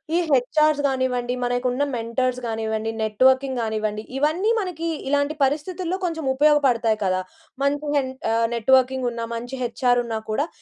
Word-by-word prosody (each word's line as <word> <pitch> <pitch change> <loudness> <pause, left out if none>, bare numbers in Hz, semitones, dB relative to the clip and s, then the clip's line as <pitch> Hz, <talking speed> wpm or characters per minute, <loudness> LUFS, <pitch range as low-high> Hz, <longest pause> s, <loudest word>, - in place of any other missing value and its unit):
ఈ - - +4
హెచ్ఆర్స్ 290 +3 +3
గానివ్వండి, 255 -2 -1
మనకున్న 245 +2 0
మెంటర్స్ 245 +2 -1
గానివ్వండి, 220 0 -2
నెట్‌వర్కింగ్ 260 +4 +2
గానివ్వండి, 215 -1 -2
ఇవన్నీ 330 +9 +2
మనకి, 340 -4 -4 0.2
ఇలాంటి 285 +2 +1
పరిస్థితుల్లో 345 +6 -1
కొంచెం 325 -3 -3
ఉపయోగపడతాయి 265 -6 +3
కదా! 185 0 +1 0.4
మంచి 290 +1 0
హెంట్ 260 -1 -2 0.2
ఆహ్ 230 0 +2
నెట్‌వర్కింగున్న 250 -1 +2
మంచి 245 +3 -6
హెచ్ఆరున్నా 245 -2 0
కూడా, 285 +8 0
255 Hz, 125 wpm, -23 LUFS, 230-290 Hz, 0.4 s, ఈ